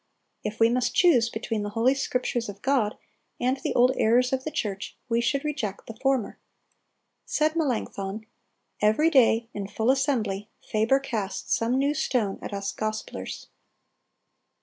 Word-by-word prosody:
If 210 +1 -4
we 225 - +6
must 245 +1 0
choose 255 -11 +5
between 220 -1 -3
the 205 - -3
Holy 245 +4 +4
Scriptures 250 -4 -1
of 200 0 -10
God 255 -6 +1 0.4
and 255 +2 +1
the - - -3
old 250 +1 +5
errors 250 +3 +3
of 260 0 0
the 310 - -2
church, 205 -8 -4
we 235 -1 +1
should 275 +4 0
reject 260 -10 -3
the 225 - -9
former." 265 -2 0 0.8
Said 310 +1 +1
Melanchthon, 220 -8 -2 0.6
"Every 220 +11 +4
day, 235 -5 +4
in 200 -1 -4
full 220 +4 +1
assembly, 225 -8 0 0.2
Faber 220 +5 +3
casts 220 -8 -3
some 235 +3 0
new 280 +2 +2
stone 235 -8 0
at - - -6
us 200 0 -3
Gospelers." 215 0 -4
235 Hz, 150 wpm, -26 LUFS, 215-265 Hz, 0.8 s, we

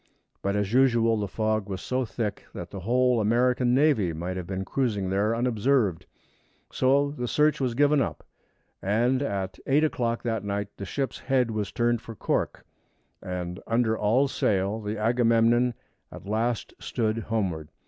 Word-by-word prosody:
But 100 0 -1
as 105 +1 -1
usual 120 -3 +4
the 100 - -2
fog 110 0 -1
was 95 -1 -3
so 130 0 -1
thick 110 -2 -4
that - - -7
the 100 - -6
whole 125 +4 +2
American 125 +3 +2
navy 130 - +3
might 90 +3 -4
have 90 -2 -5
been 95 0 -3
cruising 105 -8 -1
there 105 +4 +1
unobserved; 115 -6 +1 0.6
so 140 +2 +2
the 125 -4 -4
search 150 +2 +2
was 125 -3 0
given 145 +1 +4
up, - - -3 0.6
and 120 +7 +1
at 100 -8 -3
eight 145 +3 +3
o'clock 120 -6 -1
that 115 -4 -1
night 100 0 -3
the 100 - -5
ship's 135 +7 -3
head 130 -3 +1
was 105 -4 -3
turned 120 -1 +1
for 115 - -9
Cork, - - -2 0.6
and, 90 0 -5
under 115 -1 +2
all 115 +7 +2
sail, 100 -3 0
the 105 +1 -4
Agamemnon 115 +1 +3 0.4
at - - -10
last 110 +3 -1
stood 110 -1 -1
homeward. 95 -9 -2
115 Hz, 160 wpm, -26 LUFS, 100-125 Hz, 0.6 s, usual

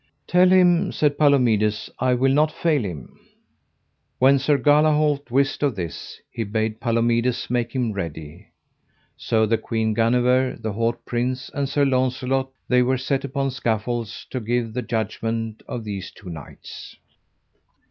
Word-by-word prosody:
Tell 180 +1 +4
him, 180 0 +4
said 145 -1 0
Palomides, 115 -8 +2
I 130 -1 +2
will 130 +2 +2
not 150 +2 +3
fail 155 -5 0
him. 80 -10 -8 1.0
When 135 +2 +5
Sir 145 +2 +2
Galahalt 150 -1 +2
wist 135 +3 +1
of 140 -5 +1
this, 85 -6 -7
he 115 - -3
bade 110 +1 -2
Palomides 120 +2 0
make 120 -1 -1
him 125 -4 0
ready. 80 -6 -7 0.7
So 110 -1 +1
the 110 +1 +1
Queen 110 -1 -1
Guenever, 125 +3 +2
the 110 -2 -4
haut 115 +2 -2
prince, 125 +1 -2
and 140 -1 -2
Sir 145 0 +2
Launcelot, 130 0 0 0.2
they 125 0 +4
were 130 +1 +1
set 130 +1 -1
upon 140 0 -2
scaffolds 115 -2 -3
to 130 - -2
give 115 0 -2
the 125 - -2
judgment 115 -1 -3
of 120 - -5
these 100 -3 -5
two 95 -4 -11
knights. 75 -4 -10
125 Hz, 145 wpm, -22 LUFS, 110-135 Hz, 1.0 s, When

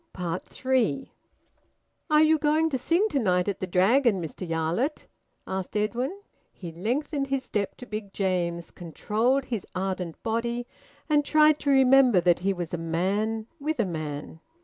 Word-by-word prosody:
THREE. 255 - -1 1.0
"Are 305 0 +5
you 315 0 +4
going 315 +2 +2
to 265 - -1
sing 345 - +2
to 285 - 0
night 180 -5 +1
at 200 - -2
the 185 - -3
Dragon, 200 +5 +3
Mr 170 +1 -6
Yarlett?" 165 - -1 0.4
asked 190 +2 -4
Edwin. 245 - -2 0.3
He 175 -3 -9
lengthened 275 - -2
his 270 -1 -1
step 200 -2 -3
to 250 - -9
Big 215 -3 -6
James's, 175 -4 -2
controlled 220 - -1
his 230 -6 -4
ardent 185 -3 -3
body, 235 +2 -1 0.4
and 295 -1 +3
tried 305 0 +4
to 285 - -2
remember 265 -5 +6
that 175 0 +3
he 195 +2 0
was 175 -3 -5
a 175 - -2
man 200 +7 -1
with 305 0 -2
a 225 - +3
man. 155 -3 -5
215 Hz, 155 wpm, -26 LUFS, 180-270 Hz, 1.0 s, remember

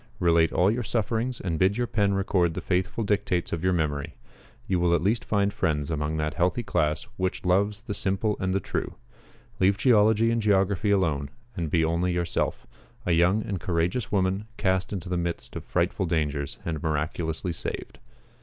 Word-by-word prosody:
Relate 85 -2 +3
all 95 +3 +3
your 120 +3 -1
sufferings, 115 +2 -1
and 80 -4 -2
bid 95 +3 +3
your 120 - +1
pen 100 -4 +1
record 90 -4 +1
the - - -2
faithful 95 +5 -1
dictates 100 -4 0
of 85 0 -3
your 95 - +3
memory. 75 -5 -1 0.5
You 95 -2 0
will 85 0 +3
at 85 - 0
least 110 +4 +1
find 100 -1 +1
friends 75 -6 -1
among 75 0 -1
that 75 -1 -1
healthy 90 - +1
class 75 -7 0
which 95 0 -2
loves 100 +4 +2
the 115 -3 -5
simple 100 +2 0
and 95 0 0
the 95 - +1
true. - - -4 0.6
Leave 95 +1 +3
geology 110 -1 +4
and 115 0 +1
geography 100 0 +2
alone, 80 -9 +1 0.3
and 85 -5 -2
be 80 +1 +2
only 85 +3 +1
yourself 85 -1 -1 0.4
a 90 - +1
young 90 +6 +3
and 95 -3 -3
courageous 85 +7 -1
woman, 95 +1 +1
cast 95 -2 0
into 95 -4 -4
the 90 0 -1
midst 85 -1 -4
of - - -5
frightful 90 +2 0
dangers, 75 -4 -1
and 80 -3 -3
miraculously 80 +3 -2
saved. - - -6
90 Hz, 180 wpm, -26 LUFS, 85-100 Hz, 0.6 s, geology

